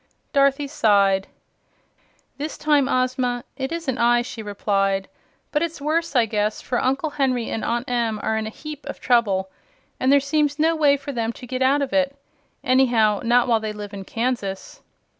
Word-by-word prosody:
Dorothy 275 0 +3
sighed. 200 -8 +2 1.1
"This 300 +2 -4
time, 295 -3 +2
Ozma, 255 -1 0
it 265 +1 -4
isn't 330 -7 -3
I," 240 0 +4
she 240 -2 -7
replied. 195 -2 0 0.4
"But 295 - +1
it's 335 -2 -2
worse, 310 +1 -1
I 240 -2 +5
guess, 210 -1 -1
for 245 - -2
Uncle 275 +4 0
Henry 255 -5 0
and 225 - -3
Aunt 240 +2 -1
Em 235 -3 -1
are 220 - 0
in 220 0 -2
a - - -3
heap 300 +5 -9
of 280 - -6
trouble, 200 -6 +1 0.5
and 260 - +2
there 285 - +6
seems 290 +1 0
no 325 +2 +2
way 290 -3 +4
for 285 +1 -6
them 230 -3 -2
to 250 - -11
get 255 +1 -4
out 275 +2 +3
of 265 - -5
it 280 -1 +1 0.5
anyhow, 240 -5 +3
not 240 +1 +3
while 230 -2 +3
they 215 -1 -4
live 205 -1 -8
in 195 -1 -6
Kansas." 225 -3 -3
250 Hz, 180 wpm, -22 LUFS, 220-280 Hz, 1.1 s, there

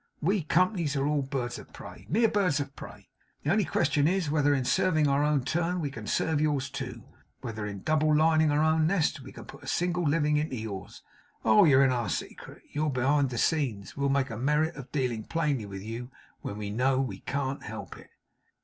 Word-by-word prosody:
We 195 +5 +1
companies 170 -1 +1
are 135 0 0
all 150 0 +1
birds 130 -3 -3
of - - -14
prey; - - -11
mere 225 +7 +4
birds 185 -8 +1
of 140 -1 -5
prey. - - -11 0.4
The 150 - +1
only 205 0 +3
question 145 -1 +2
is, 180 -4 0
whether 145 -1 +3
in 130 -2 -1
serving 155 +1 +2
our 140 +1 +2
own 150 -3 +2
turn, 175 +5 -1
we 145 -4 -2
can 110 -4 -8
serve 160 -2 +1
yours 140 -3 0
too; 125 -5 -6 0.4
whether 110 -2 -5
in 100 -2 -7
double 155 -1 +2
lining 155 0 +4
our 145 +1 +2
own 160 0 +3
nest, 170 -3 +1
we - - -11
can - - -11
put - - -12
a - - -12
single 175 0 0
living 150 -1 +2
into 150 -2 -1
yours. 105 -5 -7 0.4
Oh, 210 -2 +6
you're 140 -3 +6
in 130 - +3
our 120 -5 -1
secret. - - -6
You're 150 +1 0
behind 135 +1 +2
the 120 - -5
scenes. 120 -10 0
We'll 140 0 0
make 135 -2 +1
a 115 - -5
merit 150 +6 +1
of 135 -3 -10
dealing 125 -6 -1
plainly 150 -9 -1
with 100 -1 -7
you, 115 +3 -6 0.3
when 100 - -5
we 105 -1 -4
know 130 +4 +2
we 135 -1 -2
can't 140 0 -3
help - - -7
it. - - -15
145 Hz, 215 wpm, -28 LUFS, 130-155 Hz, 0.4 s, Oh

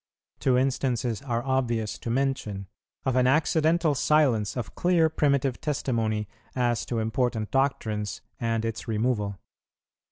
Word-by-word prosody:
Two 125 -2 +3
instances 125 -3 0
are 120 -4 -2
obvious 120 -5 0
to - - -5
mention, 120 -6 -1 0.4
of 130 - +1
an 125 0 +4
accidental 160 +3 +3
silence 130 -8 +2
of 120 - -4
clear 175 -3 +3
primitive 140 -4 +1
testimony 115 -8 -1 0.3
as 120 -2 0
to 120 - -2
important 110 0 -1
doctrines, 110 -6 0 0.2
and 115 -1 0
its 115 +1 -4
removal. 105 -3 0
125 Hz, 125 wpm, -27 LUFS, 110-135 Hz, 0.4 s, an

